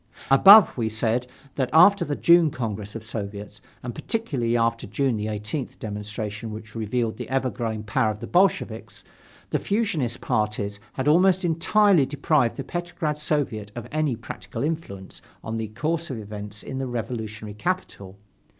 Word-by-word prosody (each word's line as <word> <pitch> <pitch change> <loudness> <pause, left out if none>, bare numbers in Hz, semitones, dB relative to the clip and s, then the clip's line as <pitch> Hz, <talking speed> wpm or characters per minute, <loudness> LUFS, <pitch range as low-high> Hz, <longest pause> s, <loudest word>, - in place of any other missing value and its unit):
Above, 195 +9 +9
we 115 -3 -1
said 115 +3 0 0.3
that 130 -3 -1
after 180 +5 +6
the 145 -3 -2
June 170 0 +5
Congress 105 -5 -5
of 115 - -6
Soviets, 105 -2 -7 0.2
and 120 -1 -5
particularly 130 - -1
after 115 -1 0
the - - -18
June 120 0 0
18th 105 +5 -4
demonstration 105 +1 -5
which 110 0 -9
revealed 115 +1 -2
the - - -6
ever 130 -1 0
growing 110 -3 -3
power 110 +1 +1
of 105 -1 -4
the 115 - -6
Bolsheviks, 185 +9 0 0.5
the - - +1
fusionist 175 - -1
parties 105 -1 -1
had 130 +1 -3
almost 180 +4 +4
entirely 175 -1 +3
deprived 145 -4 +1
the 135 - -3
Petrograd 165 -1 -3
Soviet 130 -9 -1
of 120 - -6
any 155 -4 0
practical 115 +1 -7
influence 145 -12 -5 0.2
on 110 +1 -4
the 110 -1 -3
course 160 +9 -2
of 130 - -4
events 105 -1 -7
in 135 - -5
the 135 - -2
revolutionary 110 -3 -5
capital. 105 - -4
120 Hz, 160 wpm, -24 LUFS, 110-155 Hz, 0.5 s, Above